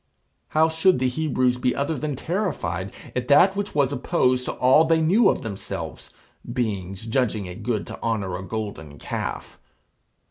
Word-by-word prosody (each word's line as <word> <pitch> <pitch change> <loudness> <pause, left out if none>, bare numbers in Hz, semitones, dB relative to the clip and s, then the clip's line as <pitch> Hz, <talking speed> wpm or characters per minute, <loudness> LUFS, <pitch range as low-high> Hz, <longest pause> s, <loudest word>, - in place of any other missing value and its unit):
How 160 +1 +3
should 165 +4 +3
the 130 0 +1
Hebrews 130 -3 0
be 125 - +1
other 145 +3 -1
than 150 +1 -3
terrified 110 - -2 0.2
at 125 -1 -2
that 180 +7 +6
which 205 -3 -3
was 140 -2 +2
opposed 130 -2 +1
to - - -2
all 130 +5 +5
they 165 0 +3
knew 185 +9 +4
of - - -1
themselves, 95 -6 -6 0.4
beings 100 -5 -3
judging 110 -4 0
it 90 0 -8
good 115 -4 -1
to - - -9
honour 105 -6 -1
a 90 - -5
golden 100 -9 -6
calf? - - -5
125 Hz, 165 wpm, -24 LUFS, 100-155 Hz, 0.4 s, that